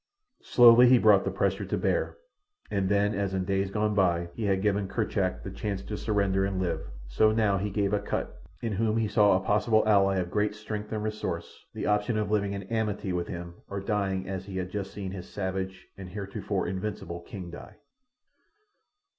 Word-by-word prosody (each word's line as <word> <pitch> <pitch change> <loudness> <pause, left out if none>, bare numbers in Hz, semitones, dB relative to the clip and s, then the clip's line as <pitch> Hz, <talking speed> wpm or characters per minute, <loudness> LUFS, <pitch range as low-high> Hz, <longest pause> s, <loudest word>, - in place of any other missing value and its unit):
Slowly 120 0 +7
he 125 - +7
brought 105 -4 +5
the - - +1
pressure - - 0
to - - -2
bear, - - 0 0.5
and 100 -2 0
then 100 +1 +2
as 100 -1 -1
in 95 -1 -1
days 95 0 0
gone 105 +1 0
by 85 -4 +2
he 110 - -4
had 95 -1 +1
given 100 -1 +1
Kerchak - - -1
the - - -6
chance 100 -2 -4
to 105 - -5
surrender 100 -3 +1
and 95 -1 -1
live, 85 -4 -1 0.3
so 110 - +3
now 105 -3 +2
he 105 +2 -2
gave 100 0 0
to 105 - +3
Akut—in 100 +1 -5
whom 110 +2 +1
he 115 -1 +1
saw 105 -3 +4
a 95 - -5
possible 110 +1 +3
ally 100 -2 +4
of 90 -1 -2
great 105 0 0
strength 105 0 -6
and 110 -1 -2
resource—the 105 -6 -5
option 105 +2 +1
of 105 -1 -1
living 100 -2 +1
in 100 0 -4
amity 105 -2 -2
with 90 -1 -2
him 85 0 -6 0.2
or 100 - -3
dying 95 -2 -1
as 95 0 -4
he 95 -1 -5
had 90 0 -3
just 100 -1 -4
seen 100 -2 -5
his 95 -2 -8
savage 95 -1 -4
and 95 -2 -9
heretofore 100 0 -3
invincible 95 -2 -4
king 85 0 -8
die. - - -10
100 Hz, 195 wpm, -28 LUFS, 95-105 Hz, 0.5 s, Slowly